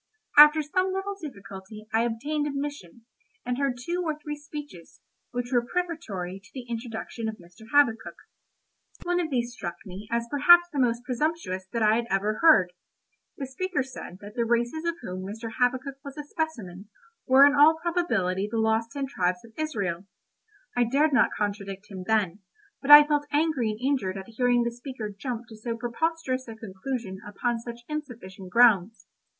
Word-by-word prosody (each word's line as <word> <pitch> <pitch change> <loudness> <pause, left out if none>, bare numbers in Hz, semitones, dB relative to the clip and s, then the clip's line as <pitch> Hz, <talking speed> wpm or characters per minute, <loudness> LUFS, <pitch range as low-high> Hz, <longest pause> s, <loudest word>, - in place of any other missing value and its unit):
After 300 +1 +8
some 370 +6 0
little 385 +1 -3
difficulty 200 -6 -9
I 225 +1 +3
obtained 290 +6 -2
admission, 275 - -6 0.4
and 250 +1 -2
heard 275 -3 0
two 340 +9 -3
or 310 -3 -2
three 300 0 -6
speeches, 290 - -10 0.3
which 245 0 -4
were 240 -2 +3
prefatory 240 - -4
to 195 - -18
the 255 -2 -6
introduction 230 -1 -5
of 220 - -6
Mr. 180 +5 -16
Habakkuk. 240 -6 +3 0.9
One 355 0 0
of 335 -3 -1
these 240 -3 -1
struck 175 -8 -5
me 195 +2 -9
as 235 0 -1
perhaps 345 +5 +7
the 285 - -1
most 240 -1 +1
presumptuous 250 - -2
that 230 -1 0
I 215 +1 +4
had 235 0 -2
ever 205 +2 0
heard. 190 - +6 0.6
The 275 - -4
speaker 320 +3 -2
said 255 -8 -9
that 205 +1 -10
the 235 - 0
races 240 +7 0
of 335 0 0
whom 185 -3 -5
Mr. 225 +4 -6
Habakkuk 260 +2 0
was 280 0 -9
a 295 - -4
specimen, 225 - -5 0.4
were 265 +2 +8
in 285 - +5
all 300 +2 +6
probability 225 - 0
the 230 - -3
lost 220 +1 +1
ten 280 -2 -2
tribes 180 -7 -1
of 225 - -17
Israel. 200 - -3 0.7
I 245 - +3
dared 280 +6 +2
not 250 - +5
contradict 205 -1 -4
him 185 -2 -7
then, 210 -4 +1 0.4
but 275 - -6
I 295 0 +12
felt 295 -1 0
angry 295 -6 +1
and 215 0 -4
injured 250 -8 -1
at 190 +3 -8
hearing 245 +1 +2
the 235 - -1
speaker 240 -3 -7
jump 240 +2 -5
to 220 - -10
so 230 +1 -5
preposterous 260 +2 -2
a 225 - -8
conclusion 215 -1 -5
upon 230 +3 -2
such 235 0 -8
insufficient 225 -11 -7
grounds. 225 -1 +4
240 Hz, 175 wpm, -26 LUFS, 210-290 Hz, 0.9 s, I